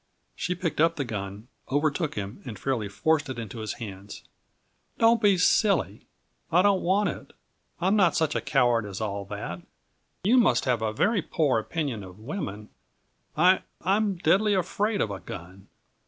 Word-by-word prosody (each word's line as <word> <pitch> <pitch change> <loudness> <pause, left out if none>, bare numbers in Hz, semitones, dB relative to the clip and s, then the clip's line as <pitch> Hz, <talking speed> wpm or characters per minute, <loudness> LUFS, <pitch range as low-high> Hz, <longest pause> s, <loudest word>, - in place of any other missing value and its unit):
She 180 - -2
picked 170 -4 -2
up 165 +1 +4
the 140 - -2
gun, 100 -1 -6 0.2
overtook 150 +2 0
him, 100 0 -5
and 115 -6 -7
fairly 115 -4 -2
forced 150 +7 +1
it 130 - -5
into 115 0 -6
his 110 -1 -3
hands. 100 -3 -9 0.7
"Don't 230 0 +4
be 200 -3 +4
silly; 180 - +2 0.4
I 175 +2 +5
don't 200 -2 +3
want 195 +3 +2
it. - - -8 0.5
I'm 190 +4 +2
not 190 -6 +4
such 160 -2 +1
a - - -1
coward 120 -4 +2
as 100 -1 -6
all 100 -2 -3
that. 95 -3 -6 0.6
You 225 +7 +4
must 240 - +3
have 125 -4 +1
a 110 -1 0
very 205 - +1
poor 145 -8 +1
opinion 135 -2 -3
of 90 0 -11
women. 110 - -6 0.7
I 180 +4 +5 0.2
I'm 200 +2 +2
deadly 195 +5 +3
afraid 205 +3 0
of 105 - 0
a 100 - -5
gun!" 95 +3 -10
145 Hz, 170 wpm, -26 LUFS, -, 0.7 s, I